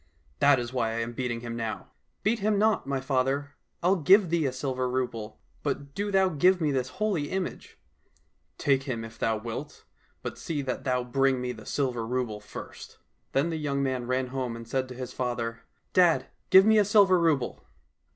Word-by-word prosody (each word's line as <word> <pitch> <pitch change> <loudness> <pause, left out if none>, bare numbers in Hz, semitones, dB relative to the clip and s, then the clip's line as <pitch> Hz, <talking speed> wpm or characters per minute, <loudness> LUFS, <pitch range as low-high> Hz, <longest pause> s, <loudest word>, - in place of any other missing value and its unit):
That 140 -1 +6
is 120 +1 -5
why 115 -3 0
I 115 - -1
am 115 +1 -4
beating 120 -1 -3
him 120 -1 -5
now." 115 -2 -4
— - - -48
'' - - -47
Beat 225 +2 +2
him 210 0 +1
not, 215 -6 +2
my 140 -1 0
father! 135 +1 0 0.3
I'll 185 +3 +4
give 185 +2 +5
thee 165 -4 +2
a - - -1
silver 130 -1 -2
rouble, 120 -4 -3 0.2
but 140 -1 -3
do 205 +4 -2
thou 190 -1 +4
give 180 +3 +3
me 155 -3 +1
this 130 -2 0
holy 190 -9 0
image! 190 -1 -4 0.2
" - - -38
— - - -43
" - - -46
Take 135 -2 +2
him 115 -3 -2
if 115 0 -12
thou 110 -1 +1
wilt, 120 +6 -7 0.4
but - - -5
see 150 -4 -3
that 130 -1 -4
thou 125 -1 +1
bring 135 +1 +2
me 125 0 -2
the 110 -3 -10
silver 125 -5 -1
rouble 115 -2 -2
first." 105 - -10 0.4
Then 145 +5 +2
the 160 - -2
young 140 -2 -1
man 130 -3 -1
ran 130 0 0
home 130 -3 -3
and 115 0 -9
said 130 +2 -1
to 125 - -8
his 125 0 -6
father, 120 -2 -2 0.2
" - - -45
Dad, 175 -3 +4 0.2
give 190 +1 +8
me 220 0 +6
a - - +6
silver 200 -3 +5
rouble 155 -7 +1
135 Hz, 215 wpm, -28 LUFS, 125-165 Hz, 0.4 s, give